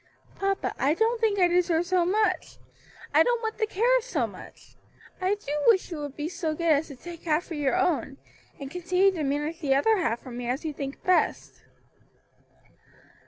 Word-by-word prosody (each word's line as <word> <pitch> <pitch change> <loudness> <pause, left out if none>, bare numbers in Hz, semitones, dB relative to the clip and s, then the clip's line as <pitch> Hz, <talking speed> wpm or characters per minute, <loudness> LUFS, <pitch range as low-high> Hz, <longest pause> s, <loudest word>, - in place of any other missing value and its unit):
"Papa, 390 0 -1
I 285 +4 +2
don't 455 +4 +1
think 430 -3 +2
I 360 -2 +5
deserve 350 -1 +2
so 360 -1 +2
much; 420 +3 0 0.6
I - - +6
don't 485 -1 +2
want 445 0 -3
the 435 - +1
care 480 +5 +3
of - - -10
so 325 - -1
much. 200 -4 -13 0.5
I 375 +2 +2
do 405 -8 -8 0.2
wish 380 -5 +4
you 325 - -4
would 290 -2 -6
be 300 0 -3
so 335 -3 -3
good 335 0 +1
as 300 +1 +2
to 280 - -10
take 340 +5 -11
half 315 +1 +1
for 345 - -8
your 295 0 0
own, 345 -7 0 0.4
and 275 -1 -7
continue 360 +3 +2
to 350 -4 -5
manage 295 +4 -2
the 275 -5 +1
other 430 +11 +3
half 240 - -1
for 255 - -10
me 240 0 -5
as 260 +5 -2
you 310 - -2
think 275 -1 -6
best." 365 -1 0
340 Hz, 200 wpm, -26 LUFS, 290-390 Hz, 0.6 s, I